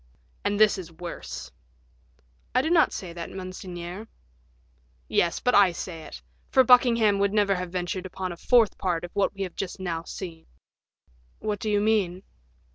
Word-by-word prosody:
"And 205 0 0
this 215 -2 +5
is 170 -3 -8
worse." 170 +1 -7 1.0
"I 255 - +4
do 320 - 0
not 330 -3 +5
say 175 -3 -6
that, 170 -1 -6
monseigneur." 185 +1 -7 1.0
"Yes, 170 - +1
but 250 - +1
I 200 -3 +6
say 165 -1 -6
it; - - -10 0.3
for 260 - +5
Buckingham 235 -5 +5
would 200 0 +2
never 205 -2 +3
have 180 -2 -4
ventured 180 +1 -3
upon 185 0 -5
a - - -6
fourth 235 +2 +3
part 175 -3 -1
of 175 - -6
what 200 0 +1
we 195 - -3
have 185 - -6
just 195 0 -4
now 170 -3 -2
seen." 165 -1 -8 0.9
"What 210 -2 -3
do 215 - -2
you 205 -1 +3
mean?" 200 -4 +1
190 Hz, 170 wpm, -26 LUFS, 175-210 Hz, 1.0 s, I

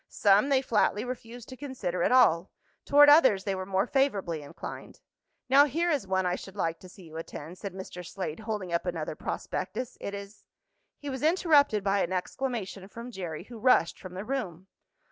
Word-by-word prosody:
Some 205 +6 +4
they 270 -1 +3
flatly 215 -2 +1
refused 245 -1 -7
to 260 - -8
consider 245 -11 -4
at - - +2
all. 200 -9 +5 0.4
Toward 290 +1 +7
others 270 -10 +6
they 195 - -1
were 185 0 -4
more 190 0 +1
favorably 205 - 0
inclined. 145 - -9 0.5
"Now 275 +3 +7
here 335 +5 0
is 275 -10 -1
one 190 0 +1
I 180 - +1
should 195 +1 -10
like 165 -4 -1
to 185 - -13
see 185 +1 -14
you 160 -1 -10
attend," 165 +1 -8
said 195 -3 -6
Mr. 185 -1 -8
Slade, 170 -3 -5
holding 210 -5 -4
up 170 +2 -1
another 160 -3 -3
prospectus. 250 +9 -4
"It 200 - -4
is 200 +1 -10 0.3
" - - -49
He 290 -1 -4
was 260 -1 -5
interrupted 300 - +3
by 200 0 +2
an 180 - -1
exclamation 195 0 -3
from 235 +4 -9
Jerry, 175 -6 -6
who 235 +2 -11
rushed 245 -7 +3
from 185 -1 -10
the 190 +3 -5
room. 195 -9 -4
200 Hz, 195 wpm, -28 LUFS, 180-255 Hz, 0.5 s, Toward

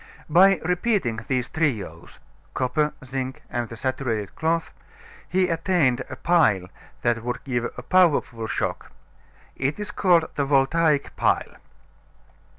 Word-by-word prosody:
By 190 +4 +6
repeating 180 - 0
these 125 -2 0
trios 110 - -3 0.4
copper, 150 +4 0
zinc, 130 0 -5
and 120 -2 -2
the 115 - -9
saturated 120 -5 -2
cloth 165 +1 -1 0.6
he 185 0 +2
attained 165 -7 +1
a - - -6
pile 130 - +2 0.3
that 120 -1 +1
would 125 +1 -4
give 120 -3 -1
a 125 - -7
powerful 145 -10 +2
shock. - - -3 0.6
It 135 +7 -2
is 210 0 -5
called 175 -6 +3
the 140 - -1
Voltaic 145 +2 +2
Pile. - - 0
135 Hz, 125 wpm, -24 LUFS, 120-170 Hz, 0.6 s, By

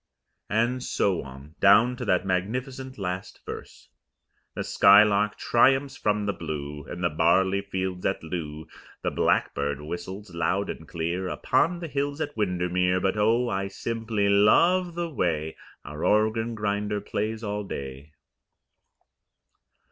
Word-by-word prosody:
And 120 +4 +1
so 100 -7 0
on, 70 +3 -12
down 110 +5 +5
to 125 - -5
that 90 -2 +1
magnificent 125 +8 -3
last 95 -1 -5
verse: - - -9 0.7
The - - -2
skylark 105 +1 +5
triumphs 135 +4 +3
from 105 -3 0
the 100 - 0
blue, 75 -3 -6
Above 90 - -7
the 85 - +2
barley 95 +5 +3
fields 95 -2 -4
at 95 - -2
Loo, 80 -2 -5 0.4
The - - 0
blackbird 70 0 0
whistles 90 +5 -7
loud 85 +4 0
and 80 - -10
clear 85 +3 -3
Upon 160 - +1
the 170 - -4
hills 145 0 -2
at 145 - -3
Windermere; 90 -2 +1
But 95 +2 0
oh, 115 +4 +2
I 95 -3 -1
simply 110 0 -2
LOVE 170 - +4
the 175 0 -2
way 80 - -1 0.3
Our 75 +1 -7
organ 110 +2 +2
grinder 105 0 -1
plays 110 +2 -3
all 105 0 -3
day! 70 -4 -7
100 Hz, 135 wpm, -26 LUFS, 90-115 Hz, 0.7 s, down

